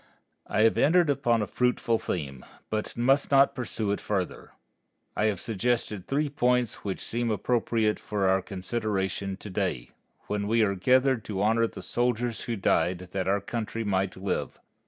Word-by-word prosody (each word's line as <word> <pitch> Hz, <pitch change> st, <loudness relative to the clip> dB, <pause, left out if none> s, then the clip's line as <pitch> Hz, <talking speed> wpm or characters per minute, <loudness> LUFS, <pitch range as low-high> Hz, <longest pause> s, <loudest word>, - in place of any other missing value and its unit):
I -, -, +1 dB
have 110 Hz, 0 st, +4 dB
entered 165 Hz, 0 st, +4 dB
upon 120 Hz, -5 st, +1 dB
a -, -, -1 dB
fruitful 120 Hz, -1 st, +1 dB
theme, 70 Hz, -7 st, -4 dB, 0.3 s
but 110 Hz, +1 st, -3 dB
must 135 Hz, +4 st, +3 dB
not 140 Hz, 0 st, +5 dB
pursue 110 Hz, -4 st, -2 dB
it 100 Hz, -, -2 dB
further. 95 Hz, -4 st, -3 dB, 0.7 s
I 105 Hz, -, +1 dB
have 105 Hz, -4 st, +1 dB
suggested 115 Hz, -2 st, -1 dB
three 150 Hz, +2 st, +1 dB
points 125 Hz, -4 st, +1 dB
which 95 Hz, -2 st, -3 dB
seem 120 Hz, 0 st, -1 dB
appropriate 110 Hz, 0 st, +1 dB
for 100 Hz, -2 st, -1 dB
our 95 Hz, 0 st, +3 dB
consideration 95 Hz, -1 st, -3 dB
to 105 Hz, -, -9 dB
day, 90 Hz, -11 st, -2 dB, 0.3 s
when 100 Hz, 0 st, -2 dB
we 115 Hz, +1 st, +3 dB
are 100 Hz, -2 st, +2 dB
gathered 130 Hz, +5 st, +3 dB
to 100 Hz, -2 st, -2 dB
honor 115 Hz, +2 st, +3 dB
the -, -, -9 dB
soldiers 120 Hz, -1 st, 0 dB
who 120 Hz, -, -2 dB
died 90 Hz, -2 st, 0 dB
that 95 Hz, -1 st, -2 dB
our 100 Hz, +1 st, +2 dB
country 115 Hz, +2 st, -4 dB
might 95 Hz, -2 st, -1 dB
live. 95 Hz, +1 st, -3 dB
110 Hz, 165 wpm, -27 LUFS, 95-120 Hz, 0.7 s, not